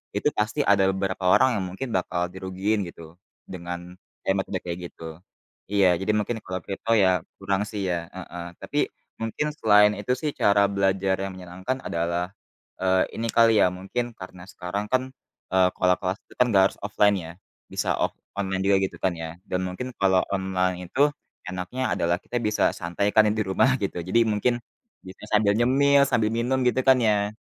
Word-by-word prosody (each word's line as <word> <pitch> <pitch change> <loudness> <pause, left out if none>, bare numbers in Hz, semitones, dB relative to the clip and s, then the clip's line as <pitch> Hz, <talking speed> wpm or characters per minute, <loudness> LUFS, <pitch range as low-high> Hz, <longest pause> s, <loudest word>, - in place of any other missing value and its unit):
itu - - +1
pasti 110 +7 -1
ada 95 -1 +4
beberapa 95 -1 -1
orang 130 +7 +6
yang - - -3
mungkin 125 +8 -5
bakal 90 -1 0
dirugiin 95 +3 -1
gitu 80 -1 -13 0.3
dengan, 90 0 -7 0.3
eee, 95 - +3
metode 95 0 -2
kayak 85 0 -4
gitu. 80 0 -10 0.5
Iya 100 -2 +4
jadi 100 +3 +1
mungkin 110 +2 -1
kalau 95 0 -3
crypto 100 +3 -4
ya 95 -4 +4 0.2
kurang 100 0 -1
sih 105 -2 -4
ya, 85 -1 -3
heeh. 90 -2 -7 0.2
Tapi - - -5 0.4
mungkin 115 +7 -2
selain 105 -1 +6
itu 105 +5 0
sih 150 -2 -2
cara 100 -4 +3
belajar 95 -1 +1
yang 95 0 -3
menyenangkan 95 +9 -5
adalah, 85 +2 -2 0.5
eee, 95 0 +3 0.2
ini 115 - -1
kali 115 -2 +5
ya - - +6
mungkin 110 +6 -4
karena 90 -1 -10
sekarang 95 +3 -4
kan, 130 - +3 0.5
eee, 95 -1 +5
kalau 90 0 +4
kelas 95 +1 -1
itu - - -18
kan 125 - +6
nggak 95 -3 +5
harus - - -19
offline 105 0 +3
ya 80 0 -8 0.4
bisa - - -1
off - - 0 0.2
online 95 -1 -1
juga 100 0 +4
gitu 95 - -2
kan 95 - +2
ya. 80 0 -6
Dan 95 -2 -2
mungkin 125 +8 -5
kalau 95 -1 +4
online 90 -2 -1
itu 140 +10 +3 0.4
enaknya 95 +8 -4
adalah 85 +1 +1
kita 120 - -4
bisa 105 -2 +1
santai 90 +4 -2
kan 110 -1 +5
ya 105 - +2
di 110 - 0
rumah 95 +7 +2
gitu. 95 -3 -2
Jadi 95 +7 +2
mungkin 115 +3 0 0.4
bisa 95 +2 -12
sambil 105 -1 +4
nyemil 140 +4 +4
sambil 110 -4 +2
minum 120 +3 0
gitu 130 - +2
kan 130 - +7
ya? 105 -2 +1
95 Hz, 185 wpm, -25 LUFS, 90-110 Hz, 0.5 s, kan